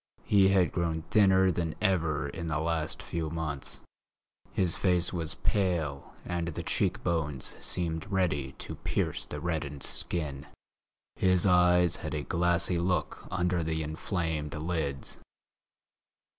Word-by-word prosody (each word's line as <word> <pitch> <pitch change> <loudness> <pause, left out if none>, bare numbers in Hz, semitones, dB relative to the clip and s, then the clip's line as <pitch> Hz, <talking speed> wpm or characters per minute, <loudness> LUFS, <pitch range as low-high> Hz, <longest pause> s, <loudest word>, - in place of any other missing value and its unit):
He 100 -2 +5
had 95 -2 +4
grown 80 -2 -1
thinner 95 -3 +5
than 85 -3 -2
ever 80 -7 +1
in 85 - -5
the 75 -1 0
last 80 -1 -2
few 80 -2 -3
months. 75 -4 -4 0.7
His 90 -4 +2
face 90 -1 +2
was 85 -3 -2
pale 85 -8 -1
and 85 -1 -2
the 85 - -4
cheek - - 0
bones 75 -6 -1
seemed 85 +2 -3
ready 75 -9 0
to - - -8
pierce - - -1
the 75 - -5
reddened 75 -4 -3
skin; 75 -4 -2 0.7
his 95 -1 +3
eyes 90 -2 +5
had - - -4
a 75 - -2
glassy 85 +1 +2
look 90 +1 -1
under 90 -1 0
the 80 0 -1
inflamed 80 -1 -2
lids. 75 -4 -2
85 Hz, 130 wpm, -30 LUFS, 80-90 Hz, 0.7 s, He